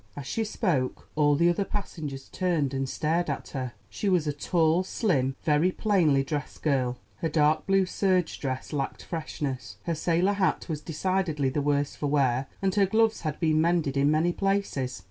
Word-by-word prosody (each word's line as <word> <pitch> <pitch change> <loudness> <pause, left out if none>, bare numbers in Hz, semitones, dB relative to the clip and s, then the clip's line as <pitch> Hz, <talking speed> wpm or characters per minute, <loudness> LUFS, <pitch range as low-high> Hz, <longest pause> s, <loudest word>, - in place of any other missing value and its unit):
As 140 - -6
she 225 +10 -1
spoke 170 - -1
all 145 -1 +4
the 170 +4 +3
other 175 +3 +2
passengers 155 -10 -5
turned 165 -7 0
and 135 0 -2
stared 165 +4 0
at 140 - -4
her. 130 -3 -4
She 205 - -2
was 180 -4 +2
a 150 - -1
tall, 165 +3 +2
slim, 145 - 0
very 155 +4 +3
plainly 170 -11 +2
dressed 145 0 -5
girl; 130 -4 +1 0.2
her 165 - -1
dark 155 +1 +2
blue 195 -1 +4
serge 185 -2 0
dress 130 +1 -4
lacked 140 -2 -3
freshness, 145 -5 -5
her 170 - -1
sailor 170 +5 +1
hat 195 -2 0
was 155 -4 -3
decidedly 160 -3 0
the 145 +3 -1
worse 145 0 0
for 145 - -2
wear, 135 -3 +1 0.2
and 190 -1 +2
her 200 -1 +3
gloves 220 +2 +2
had 155 -2 -3
been 155 -2 +3
mended 165 -4 +1
in 140 +1 +3
many 160 +3 +2
places. 195 -11 -1
155 Hz, 185 wpm, -27 LUFS, 140-185 Hz, 0.2 s, all